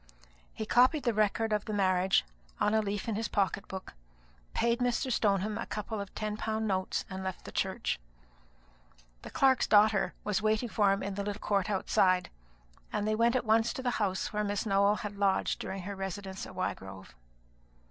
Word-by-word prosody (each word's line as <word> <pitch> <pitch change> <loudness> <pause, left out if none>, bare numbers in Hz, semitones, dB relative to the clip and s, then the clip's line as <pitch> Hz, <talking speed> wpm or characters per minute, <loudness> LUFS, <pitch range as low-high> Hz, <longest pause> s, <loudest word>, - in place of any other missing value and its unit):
He 220 - -5
copied 255 +6 +4
the 240 -2 +1
record 215 +1 +1
of 210 -1 0
the 215 - -4
marriage 190 - +2 0.3
on 210 - +2
a 220 - +4
leaf 205 0 -3
in 225 - 0
his 220 +2 -1
pocket 200 -1 0
book, 190 0 -7 0.6
paid 235 +1 +2
Mr. 245 +1 0
Stoneham 210 -1 +1
a - - -4
couple 215 0 -4
of 200 - -7
ten 215 0 -3
pound 220 0 -2
notes, 190 -2 -1
and 190 0 -6
left 190 -1 -5
the - - -8
church. - - -1 1.2
The - - -9
clerk's 265 -2 +3
daughter 205 -3 +4
was 210 -2 0
waiting 215 +2 +1
for 205 -2 +3
him 195 - 0
in 200 - -3
the 200 +1 -3
little 205 0 -4
court 200 -2 0
outside, 185 -2 +2 0.6
and 210 0 -1
they 215 - +2
went 235 +2 +3
at 250 - 0
once 225 +1 +3
to 260 - -6
the 245 - +1
house 190 0 -1
where 210 0 0
Miss 205 +1 -1
Nowell 200 0 +3
had 210 -2 -6
lodged 195 -1 +1
during 190 -1 -5
her 200 +2 -5
residence 195 0 -5
at 185 - -12
Wygrove. 95 - -5
205 Hz, 190 wpm, -31 LUFS, 195-220 Hz, 1.2 s, copied